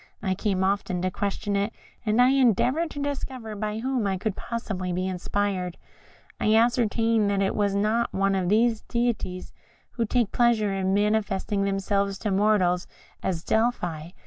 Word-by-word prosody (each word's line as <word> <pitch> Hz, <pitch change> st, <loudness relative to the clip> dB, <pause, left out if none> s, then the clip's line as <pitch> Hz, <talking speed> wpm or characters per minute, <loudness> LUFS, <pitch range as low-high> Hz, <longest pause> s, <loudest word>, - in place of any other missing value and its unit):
I 190 Hz, -2 st, +1 dB
came 190 Hz, 0 st, -1 dB
often 190 Hz, -2 st, 0 dB
to 185 Hz, -, 0 dB
question 200 Hz, +1 st, -2 dB
it, 200 Hz, +2 st, 0 dB, 0.3 s
and 215 Hz, 0 st, +1 dB
I 250 Hz, +1 st, +6 dB
endeavoured 270 Hz, -, +3 dB
to 285 Hz, -, -7 dB
discover 260 Hz, -6 st, -4 dB
by 210 Hz, +1 st, -3 dB
whom 250 Hz, -2 st, -1 dB
it 190 Hz, -1 st, -1 dB
could 210 Hz, 0 st, -2 dB
possibly 195 Hz, -6 st, -4 dB
be 185 Hz, +1 st, -1 dB
inspired. 185 Hz, -1 st, -2 dB, 0.6 s
I 215 Hz, +1 st, +3 dB
ascertained 225 Hz, -2 st, +2 dB
that 200 Hz, -1 st, +1 dB
it 195 Hz, -, 0 dB
was 200 Hz, -1 st, 0 dB
not 220 Hz, +4 st, +1 dB
one 195 Hz, 0 st, +1 dB
of 185 Hz, -2 st, 0 dB
those 225 Hz, +1 st, +3 dB
deities 235 Hz, -6 st, -2 dB, 0.4 s
who 235 Hz, -, -1 dB
take 235 Hz, -2 st, +1 dB
pleasure 230 Hz, -4 st, +2 dB
in 190 Hz, 0 st, 0 dB
manifesting 205 Hz, -1 st, 0 dB
themselves 195 Hz, 0 st, 0 dB
to 210 Hz, +1 st, -2 dB
mortals, 190 Hz, -3 st, +2 dB, 0.3 s
as 175 Hz, -4 st, -2 dB
at -, -, -30 dB
Delphi. 180 Hz, -9 st, 0 dB
205 Hz, 165 wpm, -26 LUFS, 190-230 Hz, 0.6 s, I